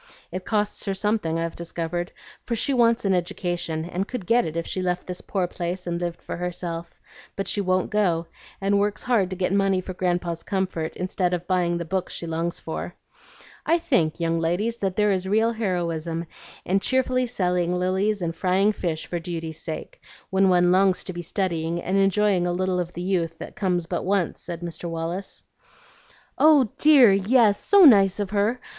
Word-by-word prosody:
It 185 0 -5
costs 210 -1 -1
her 195 -1 -1
something, 200 -5 0
I've 165 0 -3
discovered, 170 +1 -4 0.3
for 235 - -3
she 275 +5 0
wants 235 -3 +3
an 195 - +3
education, 175 -2 -2
and 180 +3 -3
could 245 -7 -5
get 235 +5 +3
it 160 +1 -4
if 165 - -2
she 185 - -3
left 180 -1 -1
this 180 -1 -6
poor 190 -3 -1
place 180 +1 -4
and 170 0 -3
lived 175 -1 -4
for - - -5
herself; 170 -1 -5 0.4
but 195 - -3
she 205 - 0
won't 185 -1 0
go, 180 -6 +1 0.3
and 200 +1 +2
works 205 0 -1
hard 225 -7 +2
to 185 - -4
get 185 +1 -1
money 195 -1 +2
for 185 0 -6
Grandpa's 175 -2 -1
comfort, 185 -5 -2
instead 180 0 -1
of 175 0 -6
buying 175 -2 +1
the 170 - -4
books 185 +2 -3
she - - -4
longs 165 +1 -2
for. - - -6 0.7
I 335 - +3
think, 250 - +1
young 165 0 0
ladies, 185 +8 0
that 195 -4 -2
there 210 -1 +3
is 190 -1 -1
real 220 +3 +3
heroism 170 -6 -2 0.4
in 195 +2 +2
cheerfully 255 +2 +1
selling 180 -6 0
lilies 190 +2 0
and 165 0 -2
frying 190 +4 +2
fish 170 -6 -3
for 175 - -3
duty's 165 -2 -5
sake - - -7 0.3
when 190 0 +4
one 175 -1 +4
longs 185 0 +3
to 185 - -6
be 175 - -5
studying, 170 -2 -2
and 185 +2 -2
enjoying 195 -2 +3
a - - 0
little 185 0 0
of 175 -1 -3
the 175 - -5
youth 170 -3 -1
that - - -9
comes 180 -4 0
but 175 +1 -3
once," 190 -3 0
said 170 -1 -6
Mr. 170 0 -5
Wallace. 165 +4 -4 1.0
"Oh 295 -7 +5
dear, 275 -9 +7
yes, 205 +1 +4
so 400 -3 +6
nice 200 -7 +6
of 200 -1 -2
her! 210 +4 +1
185 Hz, 190 wpm, -24 LUFS, 170-200 Hz, 1.0 s, dear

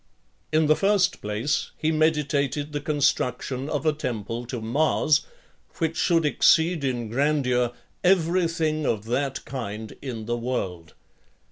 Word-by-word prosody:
In 155 0 +3
the 155 +1 +5
first 195 0 +2
place, 105 +8 -1
he 160 - 0
meditated 150 -2 0
the 145 - -2
construction 140 -2 0
of 150 +1 -2
a 155 - +3
temple 120 -4 -4
to 125 -1 -4
Mars, 145 +5 +2 0.5
which 165 -1 -1
should 165 -3 +2
exceed 160 +2 +3
in 125 -4 -1
grandeur 125 -1 +1 0.3
every 180 -1 +3
thing 155 -2 -1
of 110 -2 -1
that 135 +3 -2
kind 110 -4 -6
in 115 -5 -5
the 120 +1 -1
world. 95 -9 -4
140 Hz, 135 wpm, -25 LUFS, 120-155 Hz, 0.5 s, the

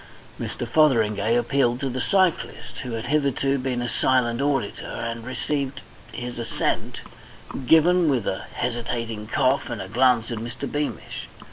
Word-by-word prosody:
Mr. 120 - -4
Fotheringay 115 -6 +3
appealed 120 0 +2
to 135 - -1
the 130 0 -2
cyclist, 180 -10 0
who 125 -3 -5
had 115 0 -3
hitherto 140 -2 +1
been 125 -2 -1
a - - -2
silent 125 -1 +2
auditor, 140 -7 -1
and 115 0 -4
received 140 +2 -2 0.3
his 120 -1 -5
assent 115 - -2 0.7
given 165 +2 +5
with 125 -7 +1
a 95 - -2
hesitating 115 -3 -3
cough 130 +4 +1
and 115 - -4
a 95 - -5
glance 120 +1 +3
at 115 - -3
Mr. 115 +1 -5
Beamish. 145 0 -4
125 Hz, 145 wpm, -24 LUFS, 115-140 Hz, 0.7 s, given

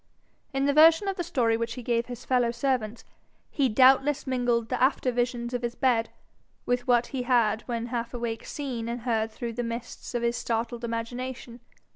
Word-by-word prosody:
In 270 -1 0
the 285 - +3
version 325 +6 +6
of 390 - -1
the 350 - -2
story 245 -9 +1
which 230 0 -3
he 250 - -7
gave 235 0 0
his 245 -1 -8
fellow 250 -2 +2
servants, 235 -2 -1 0.5
he 275 -3 +1
doubtless 270 +5 +4
mingled 245 -3 0
the 255 - -2
after 260 -1 +2
visions 240 0 -2
of 245 - -1
his 240 0 -3
bed 235 -4 +2 0.6
with 245 +1 -1
what 240 -1 +4
he 265 - -1
had 235 -4 +2
when 235 -2 -2
half 235 -1 -3
awake 235 -2 -4
seen 250 -6 -4
and 240 0 -4
heard 225 -2 0
through 230 +1 -5
the 245 +2 -3
mists 235 +1 -6
of 240 - -1
his 235 0 +1
startled 235 +1 -2
imagination. 235 +1 -5
240 Hz, 190 wpm, -27 LUFS, 230-255 Hz, 0.6 s, version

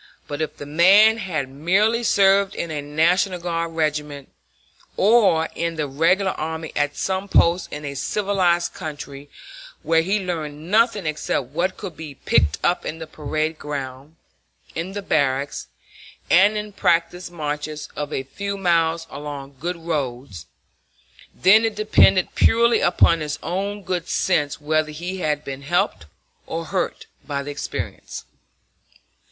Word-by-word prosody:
But 145 +1 -4
if 155 - -3
the 145 - -7
man 195 +9 +6
had 160 -9 -2
merely 190 - +1
served 195 -3 +3
in 170 - -4
a 150 -2 -3
National 170 +6 +1
Guard 170 -1 -3
regiment, 150 -3 -2 0.7
or 195 -7 +4
in 170 0 -2
the 155 -2 -2
Regular 165 +8 +2
Army 160 0 -5
at 145 0 0
some 190 +1 -2
post 170 0 +3
in 150 0 -6
a 140 - -4
civilized 175 +2 0
country 145 -2 -8 0.5
where 165 +1 +3
he 195 +5 0
learned 160 -3 -5
nothing 220 -3 +3
except 155 -4 -2
what 175 +6 -1
could 185 -5 -7
be 155 -3 -9
picked 75 - +2
up 180 - +1
on 160 - -5
the 160 - -7
parade 155 +1 -3
ground, 140 +1 -6 0.6
in 170 +4 -4
the 205 0 -5
barracks, 140 -4 0 0.6
and 200 +4 +5
in 210 0 -5
practice 175 -1 0
marches 150 -2 -4
of 150 0 -4
a 135 - -2
few 200 +9 -5
miles 165 -3 +1
along 140 -1 -7
good 175 +4 -3
roads, 130 - -4 0.8
then 205 +5 +5
it 225 -2 0
depended 195 -3 +4
purely 235 +1 +4
upon 165 - +4
his 150 -1 -3
own 200 +4 -3
good 180 -2 -3
sense 150 -6 0
whether 155 +1 0
he 175 +5 -5
had 150 -3 -1
been 135 0 -6
helped 140 - -1 0.4
or 165 0 -4
hurt 185 +2 -2 0.2
by 140 -2 -3
the 145 - -5
experience. 145 - -6
165 Hz, 145 wpm, -22 LUFS, 150-190 Hz, 0.8 s, man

